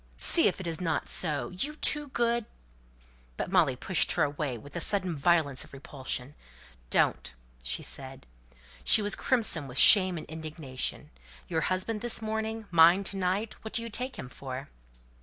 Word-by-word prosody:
See 335 - +6
if 195 - -1
it 190 - -7
isn't 165 0 -2
so! 155 -5 -1
You 275 +12 -5
two 295 -1 +1
good 235 -3 0 0.5
" - - -31
But - - -4
Molly 165 -9 +3
pushed 175 +6 -1
her - - +1
away 145 -3 -3
with 140 +6 -14
a - - -3
sudden 185 -4 +2
violence 145 -3 +1
of - - -17
repulsion. 135 -1 -6 0.6
"Don't!" - - +1 0.3
she - - -3
said. - - -7 0.6
She 215 - +6
was 205 -1 0
crimson 215 - +1
with 125 0 -7
shame 185 -4 +7
and 155 - -7
indignation. 155 -4 -6 0.4
"Your - - -1
husband 190 +4 -1
this 240 -1 0
morning! 220 0 -4
Mine 170 +3 +6
to 195 - -4
night! 195 +4 -1
What 220 - -6
do 230 - +1
you 230 - -7
take 255 +4 -4
him - - -8
for?" 130 +1 -8
175 Hz, 170 wpm, -28 LUFS, 140-220 Hz, 0.6 s, shame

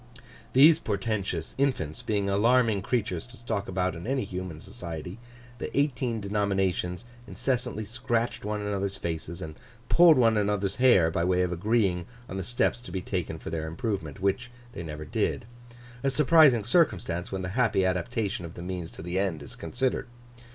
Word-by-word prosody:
These 155 +5 +7
portentous 100 - -2
infants 125 - 0
being 100 -2 0
alarming 110 +1 +3
creatures 100 -4 -1
to 120 +1 -14
stalk 110 -4 -3
about 95 0 0
in 85 +5 -7
any 135 0 0
human 90 -4 -5
society, 90 -1 -7 0.4
the - - -3
eighteen 130 -5 0
denominations 100 -2 -1 0.2
incessantly 125 -4 -2
scratched 115 +2 -1
one 105 0 -2
another's 100 -1 -2
faces 85 +1 -4
and 80 - -6 0.4
pulled 170 -3 +7
one 115 -3 +4
another's 100 -1 0
hair 120 -11 +5
by 85 - 0
way 90 +1 +2
of 90 - -1
agreeing 95 -1 +1 0.2
on 95 - -6
the 95 - -2
steps 120 +1 0
to 120 - -10
be 95 - -2
taken 90 -4 -3
for 80 - -7
their 80 -1 -3
improvement—which 100 +5 -2 0.2
they - - -6
never 75 -2 -6
did; 75 - -1 0.6
a 135 - +2
surprising 145 -4 +5
circumstance, 100 - +1
when 95 -1 -3
the 95 - -3
happy 105 -3 +2
adaptation 95 +2 -1
of 85 -1 -8
the 85 - -7
means 90 -2 -4
to - - -10
the 90 +2 -1
end 90 -7 -1
is 70 - -9
considered. 130 -1 -2
100 Hz, 165 wpm, -28 LUFS, 90-120 Hz, 0.6 s, These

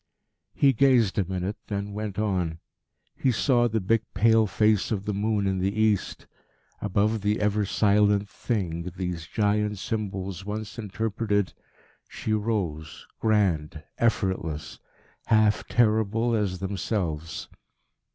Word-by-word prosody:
He 140 -1 +4
gazed 120 -5 +3
a 95 - +1
minute, 95 +2 -3
then 100 0 -3
went 105 -1 -4
on. 90 -6 0 0.6
He 130 - +1
saw 120 +1 +3
the 110 -1 0
big 110 +3 +2
pale 110 +2 +4
face 105 0 +2
of 100 -3 -2
the 105 - -1
moon 105 0 0
in 95 -1 0
the 100 +3 -1
east. 110 -3 +1 0.6
Above 105 +2 +1
the 105 +1 +1
ever 105 0 +1
silent 105 0 +3
Thing 90 -6 -3
these 90 -3 -4
giant 105 +2 0
symbols 95 -3 -4
once 105 +3 -5
interpreted, 105 -1 -1 0.6
she 110 - -3
rose, 95 -8 -2
grand, 85 -8 +1 0.2
effortless, 95 -9 -1 0.5
half 110 -1 +3
terrible 110 0 +2
as 100 -4 0
themselves. 90 -4 -3
105 Hz, 120 wpm, -26 LUFS, 95-110 Hz, 0.6 s, He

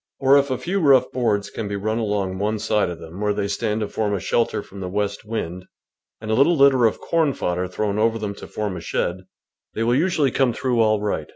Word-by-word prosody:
Or 135 0 +5
if 140 0 -1
a 130 - -1
few 190 +8 -2
rough 140 -6 +4
boards 105 -5 0
can 110 - -4
be 100 - -3
run 110 +3 -1
along 100 -4 -2
one 105 +2 0
side 105 -2 0
of 85 - -6
them 85 +4 -10
where 105 -1 +1
they 100 -1 -1
stand 105 +2 -1
to 105 - -1
form 105 -1 -1
a - - -2
shel 115 +6 +1
ter - - -4
from 100 - -12
the 90 -1 -4
west 100 +1 -2
wind 90 -5 -4 0.5
and 110 0 -5
a - - +2
little 145 +8 +4
litter 135 -3 +5
of 110 - -3
corn 160 -4 +1
fodder 90 -3 -2
thrown 100 +3 -2
over 115 +1 +2
them 105 -2 -4
to - - -11
form 105 -3 -3
a - - -6
shed, 90 - -2 0.6
they 110 - -1
will 120 +1 +2
usually 150 -2 +2
come 130 -2 +2
through 125 0 -1
all 110 -1 +3
right. 105 0 -3
110 Hz, 250 wpm, -22 LUFS, 100-125 Hz, 0.6 s, Or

